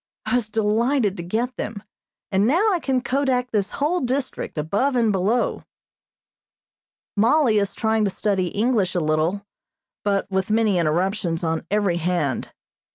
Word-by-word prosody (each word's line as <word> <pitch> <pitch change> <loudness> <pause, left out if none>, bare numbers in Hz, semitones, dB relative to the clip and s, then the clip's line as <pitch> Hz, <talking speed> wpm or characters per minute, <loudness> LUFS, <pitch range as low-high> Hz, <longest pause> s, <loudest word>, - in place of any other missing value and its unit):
I 215 - -2
was 240 -3 +1
delighted 220 +1 +1
to - - -4
get 230 +8 -2
them, 210 -1 -5 0.5
and 195 +2 +3
now 370 - +3
I 355 - +1
can 265 -4 0
kodak 255 -1 0
this 205 -2 -1
whole 315 +5 0
district, 260 - -3
above 205 - 0
and 230 -3 +3
below. 205 +5 0 1.5
Mollie 225 +1 +4
is 200 -1 -2
trying 220 0 +1
to - - +1
study 190 -1 0
English 205 -2 0
a - - +2
little, 160 +5 0 0.6
but 200 -1 +1
with 190 0 0
many 215 -4 +2
interruptions 170 +1 0
on 160 -1 -2
every 200 -4 +1
hand. 170 -6 -1
210 Hz, 150 wpm, -23 LUFS, 185-245 Hz, 1.5 s, Mollie